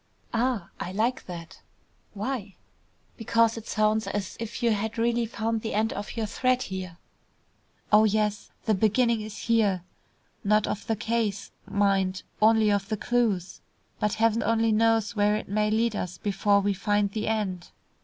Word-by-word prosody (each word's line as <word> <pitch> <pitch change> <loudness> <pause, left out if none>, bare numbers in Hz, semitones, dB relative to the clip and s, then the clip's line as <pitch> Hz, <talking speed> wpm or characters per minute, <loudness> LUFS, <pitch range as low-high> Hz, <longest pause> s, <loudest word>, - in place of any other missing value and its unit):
"Ah! 235 -5 0
I 180 - -4
like 225 +6 -1
that." 170 -2 -9 0.5
"Why?" 210 -3 -4 0.6
"Because 230 0 +2
it 225 -1 -8
sounds 215 0 +1
as 205 -2 -3
if 230 +2 -5
you 235 - +4
had 220 +2 -2
really 235 0 +1
found 225 0 -2
the 220 - -3
end 220 +1 +1
of 205 +3 -6
your 225 - 0
thread 255 +4 +1
here." 185 -4 -6 1.0
"Oh, 215 +1 +7
yes. 210 -1 0 0.2
The 220 - +3
beginning 225 +3 +2
is 215 0 -7
here. 210 -6 +2 0.6
Not 210 +1 +3
of 205 - -4
the 225 - +1
case, 220 -2 -2 0.2
mind; 195 -2 +1 0.2
only 220 -1 +5
of 200 0 0
the 215 - -1
clues. 215 -7 0 0.4
But 210 +1 0
heaven 225 +1 +2
only 225 0 +2
knows 225 0 +2
where 210 0 +3
it 215 - -4
may 210 +2 +1
lead 225 +1 +1
us 180 -2 -4
before 200 +2 +2
we 200 0 +1
find 205 +1 0
the 215 +1 -3
end." 200 -5 -2
215 Hz, 165 wpm, -27 LUFS, 200-225 Hz, 1.0 s, Oh